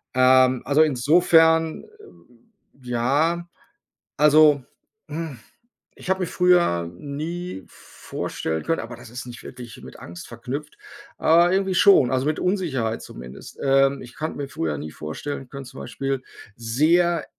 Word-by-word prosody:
Ähm, 130 0 +4
also 145 +3 +3
insofern, 160 +3 +3
äh, - - -17 1.0
ja, 145 +9 0 0.7
also, 150 -2 +5 0.5
hm, 155 -5 -5 0.6
ich - - -10
habe 190 0 +1
mir - - +1
früher 175 - +2
nie 155 - -6
vorstellen 80 0 -5
können 165 - -1
aber 115 +1 -8
das 125 -2 -13
ist 125 - -7
nicht 120 -1 -10
wirklich 120 -3 -10
mit - - -12
Angst 85 0 -10
verknüpft, 130 +5 -7 0.4
aber 170 +2 +4
irgendwie 190 -1 0
schon, 170 -10 +6
also, 130 +1 0
mit 155 - -1
Unsicherheit 145 - -1
zumindest. 60 +2 -11
Ähm, 135 0 +3
ich 120 -1 -12
konnte 155 +1 -4
mir 140 -1 -4
früher 80 - -3
nie 75 +1 -7
vorstellen 125 - -6
können 140 -1 -8
zum 125 - -10
Beispiel 135 -1 -3 0.3
sehr 155 +9 +2
140 Hz, 140 wpm, -23 LUFS, 120-165 Hz, 1.0 s, schon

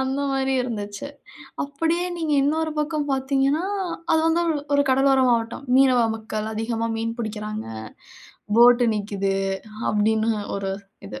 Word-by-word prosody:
அந்த 265 +1 -1
மாரி 270 0 0
இருந்துச்சு. 205 0 -5 0.6
அப்படியே 325 +5 -1
நீங்க 320 -3 -2
இன்னொரு 315 +3 0
பக்கம் 300 -1 -1
பார்த்தீங்கனா, 270 +3 +1 0.5
அது 320 - +4
வந்து 330 +1 +2
ஒரு 315 - +1 0.2
ஒரு 285 - +4
கடலோர 270 0 +4
மாவட்டம். 230 +3 -1
மீனவ 260 -2 +5 0.2
மக்கள் 220 -1 -4
அதிகமாக 225 +1 -2
மீன் 230 +1 -3
பிடிக்கிறாங்க. 215 -1 -4 0.9
போட் 245 +1 +7
நிக்குது. 200 -2 -1 0.5
அப்படின்னு 220 +1 +2 0.3
ஒரு 195 -1 -3 0.4
இது. 105 - -8
245 Hz, 130 wpm, -23 LUFS, 220-280 Hz, 0.9 s, போட்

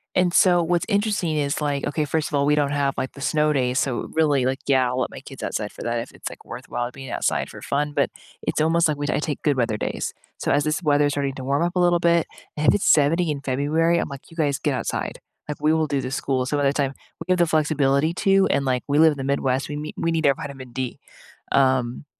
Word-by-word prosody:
And 180 -1 +3
so, 175 -1 +5
what's 175 +1 0
interesting 205 -6 0
is, 145 0 0
like 145 -2 -1
okay, 150 0 -1
first 155 +1 -1
of 145 - -3
all, 140 0 +2
we 150 - +3
don't 145 -1 +1
have, 140 -1 0
like, 130 0 -3
the 140 - -11
snow 150 +1 +2
days, 130 -2 +1
so, 130 -4 -2
really, 145 -5 +2
like 130 +1 0
yeah, 130 -2 +3
I'll 125 +1 -2
let - - 0
my - - -10
kids 135 -1 -11
outside 105 -1 -3
for - - -11
that 120 0 -1
if 115 - -6
it's, - - -7
like, - - -13
worthwhile 120 0 -5
being 135 0 -9
outside - - -1
for - - -11
fun 145 +1 -1
but - - +1 0.3
it's - - -1
almost 165 +1 +3
like 150 -1 -1
we 145 0 -3
I - - +1
take 150 -2 -3
good 145 -3 +1
weather 115 -3 0
days. - - -3 0.2
So, - - -1
as 145 0 +3
this 155 +3 -1
weather 145 -1 +3
is 145 - -1
starting 140 -1 -1
to 130 - -7
warm 140 +4 +1
up 175 +1 -1
a - - +2
little 175 -1 +4
bit, 170 -1 +3 0.3
and 150 0 +3
it's 205 - -1
70 160 +2 +4
in 140 -1 -4
February, 150 +5 +1
I'm - - -1
like, 140 +3 -10
"You 165 - -16
guys 145 -3 +1
get 145 - 0
outside." 120 - -3 0.3
Like, 150 - -4
"We 155 +1 +3
will 160 -1 +1
do 140 -1 0
the 130 - -5
school" 130 -2 -1
so, 145 +2 -1
by 145 - 0
the 140 0 +3
time, 140 -2 0 0.3
we - - -7
give 185 0 +3
the 170 - +4
flexibility 150 0 +2
to, 195 0 +3
and, 140 -1 +1
like, 125 -1 0
we 145 +2 +2
live 160 -1 +6
in - - -10
the 135 - -4
Midwest, 135 -1 0
we 145 0 -5
meet 150 +1 -6
we 165 - 0
need 160 -3 +1
our 135 - +4
vitamin 135 -5 -8
D. 130 -2 -4 0.5
Um, 130 -1 +2
145 Hz, 270 wpm, -23 LUFS, 135-160 Hz, 0.5 s, live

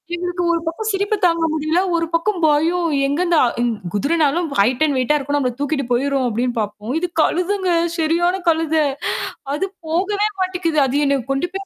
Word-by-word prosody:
எங்களுக்கு 355 0 -3
ஒரு 335 - +1
பக்கம் 430 +7 -3
சிரிப்பு 400 +2 0
தாங்க 335 -1 +2
முடியல. 315 +2 0 0.2
ஒரு 330 - +1
பக்கம் 360 +3 0
பயம். 330 +4 +2 0.2
எங்கந்த 340 +4 +1 0.3
இ - - +2 0.3
குதிரனாலும் 305 - +1
ஹைட் 245 +8 +3
அண்ட் 285 -3 0
வெயிட்ட்டா 260 +4 +2
இருக்கும். 285 +1 -2
நம்மள 255 -3 0
தூக்கிட்டு 285 -2 -1
போயிரும். 270 +1 +1
அப்படின்னு 240 +2 -1
பாப்போம். 210 +3 -4
இது 360 - -1
கழுதுங்க 365 +3 0 0.3
சரியான 340 +3 +1
கழுத. 320 -1 +1 0.8
அது 385 +6 -1 0.2
போகவே 400 +6 0
மாட்டேங்குது. 360 -4 0
அது 285 +3 0
என்ன 280 -1 +2
கொண்டு 275 +6 -1
போய் 390 0 -5
325 Hz, 165 wpm, -19 LUFS, 280-355 Hz, 0.8 s, ஹைட்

